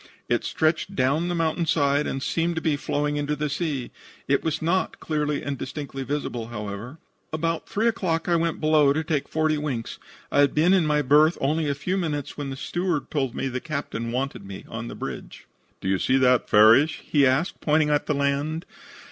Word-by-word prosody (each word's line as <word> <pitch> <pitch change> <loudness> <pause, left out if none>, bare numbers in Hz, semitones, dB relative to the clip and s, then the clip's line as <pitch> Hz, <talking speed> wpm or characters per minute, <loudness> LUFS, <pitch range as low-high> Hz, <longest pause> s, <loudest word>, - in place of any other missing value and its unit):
It - - +1
stretched 160 0 0
down 140 +6 +1
the 175 - -1
mountain 165 0 0
side, 145 -1 +2
and 135 - -3
seemed 170 +1 0
to - - 0
be 155 -2 +1
flowing 145 +1 -1
into 145 +1 -1
the 150 0 -2
sea. 150 -5 -2 0.4
It 140 - +2
was 160 -1 -1
not 175 +4 0
clearly 150 -2 -1
and 140 -2 -4
distinctly 135 0 -5
visible, 130 -4 -3
however. 105 +4 -6 0.3
"About 165 +1 -2
3 220 +3 +1
o'clock 180 -8 0
I 175 - +3
went 165 -1 0
below 155 -2 +4
to 160 +2 -1
take 150 -3 -1
forty 155 -1 +1
winks. 130 -6 -4 0.3
I - - +2
had 140 -1 +4
been 165 +5 +4
in 180 -5 +3
my 150 -1 +2
berth 150 +5 +5
only 150 +2 0
a 140 - 0
few 180 +7 -2
minutes 150 -6 -3
when 145 -2 -4
the 135 - -5
steward 175 0 -2
told 135 -5 -1
me 135 - -2
the 130 -1 -3
captain 140 -7 -4
wanted 130 -3 -3
me 95 -1 -9
on 115 +1 -6
the - - -7
bridge. - - -7 0.4
"'Do - - -4
you 95 -1 +1
see 130 - +2
that, 125 -2 +3
Farrish?' 115 +9 +5
he 140 -3 +4
asked, 135 +8 0
pointing 150 0 +2
at 145 0 +1
the 150 - +1
land. 140 +3 -1
150 Hz, 205 wpm, -25 LUFS, 135-160 Hz, 0.4 s, berth